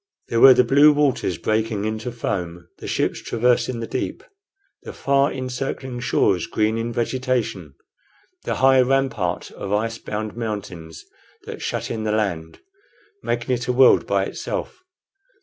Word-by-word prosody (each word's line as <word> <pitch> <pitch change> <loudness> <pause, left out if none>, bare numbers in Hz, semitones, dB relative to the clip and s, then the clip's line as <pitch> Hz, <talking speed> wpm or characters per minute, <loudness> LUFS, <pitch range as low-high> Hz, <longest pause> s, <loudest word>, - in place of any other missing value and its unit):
There 115 - +1
were 130 +1 +9
the 125 - +5
blue 140 +5 +6
waters 145 - 0
breaking 110 +2 -1
into 110 +2 -3
foam, 90 -7 -4
the - - -8
ships - - -1
traversing 120 0 0
the - - -3
deep, - - -4 0.6
the - - -9
far 140 0 +1
encircling 130 0 -4
shores 95 -7 +1
green 110 +1 0
in 115 +1 -3
vegetation, 120 - -2 0.7
the - - -2
high 130 0 +5
rampart 125 -9 0
of 100 - -7
ice 115 +2 -1
bound 105 0 -5
mountains 100 -8 -6 0.4
that - - -8
shut - - -3
in 110 -2 -3
the 110 - -1
land, 90 -7 -2 0.6
making 120 +2 -1
it 120 -1 -3
a 125 - +1
world 130 +1 +5
by - - +1
itself. 365 - -5
115 Hz, 150 wpm, -22 LUFS, 105-130 Hz, 0.7 s, were